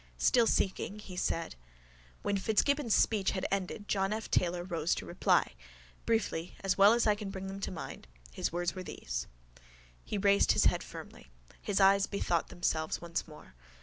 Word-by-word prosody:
Still 240 -3 +4
seeking, 195 +1 0
he 200 -3 -9
said: 165 -2 -1 0.7
—When 205 - 0
Fitzgibbon's 225 +5 +2
speech 205 -4 +2
had 185 - -2
ended 195 +2 -3
John 195 0 0
F 220 0 -4
Taylor 175 0 +1
rose 170 -2 -1
to - - -6
reply. - - +2 0.6
Briefly, 185 -6 -1
as 195 -1 +1
well 200 +2 +7
as 235 - +2
I 210 - +5
can 205 -1 -6
bring 195 -1 -6
them 195 +1 -6
to - - -3
mind, 165 - -8 0.2
his - - -2
words 175 +1 -1
were 185 - -6
these. - - -5 0.8
He - - -3
raised 200 0 +4
his - - +3
head - - +3
firmly. - - -11 0.3
His 205 -1 -1
eyes 195 0 +5
bethought 175 -4 -1
themselves 160 -2 -1
once 170 -1 -4
more. 150 - -14
195 Hz, 175 wpm, -31 LUFS, 175-205 Hz, 0.8 s, well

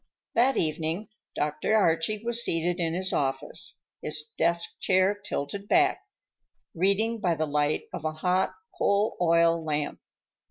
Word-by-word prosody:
That 255 +4 +3
evening 160 +6 -1 0.3
Dr. 150 +9 0
Archie 200 +3 +1
was 235 0 +4
seated 170 0 0
in 165 -1 -1
his 185 +1 0
office, 135 -1 0 0.2
his 150 0 -3
desk 170 +1 0
chair 190 +1 +3
tilted 200 -1 -5
back, 365 - +3 0.7
reading 200 +6 +1
by 180 -5 +1
the 155 0 -1
light 150 0 0
of - - -5
a 155 0 -2
hot 180 +4 0 0.2
coal 205 - +1
oil 170 -1 +3
lamp. 150 -1 -2
170 Hz, 135 wpm, -27 LUFS, 155-205 Hz, 0.7 s, was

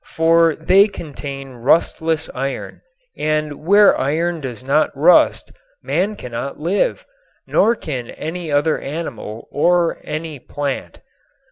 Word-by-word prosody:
For 165 0 +4
they 195 +6 +4
contain 140 -7 -8
rustless 160 +5 +1
iron, 135 +1 -5 0.3
and 155 -1 -2
where 200 +4 +6
iron 165 +4 -1
does 125 -3 -6
not 140 +4 +2
rust - - +4 0.3
man 175 +11 0
cannot 125 - -6
live, 185 - 0 0.4
nor 230 +3 +3
can 130 - -5
any 165 0 -5
other 145 +2 +2
animal 135 -8 -6
or 175 +2 +2
any 155 -1 -5
plant. 135 - -5
155 Hz, 115 wpm, -19 LUFS, 135-170 Hz, 0.4 s, where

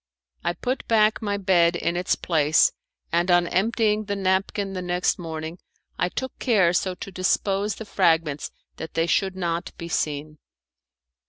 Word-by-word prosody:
I 175 - 0
put 250 +9 -3
back 215 -1 +3
my 205 -2 -1
bed 175 -3 +3
in 170 0 -1
its 180 +1 +1
place, 155 -2 +3 0.4
and 175 +2 +1
on 175 0 +5
emptying 215 +3 +1
the 205 0 -2
napkin 195 +1 0
the 185 - -3
next 180 0 0
morning 160 0 -6 0.4
I 180 - +1
took 260 +6 -5
care 195 -9 +3
so 185 0 0
to 195 - -8
dispose 195 +2 0
the 220 - -8
fragments 165 -7 +1 0.3
that 160 - -8
they 165 - +2
should 190 +2 +1
not 170 -1 -2
be 170 - -7
seen. 150 -1 -2
180 Hz, 160 wpm, -24 LUFS, 170-200 Hz, 0.4 s, on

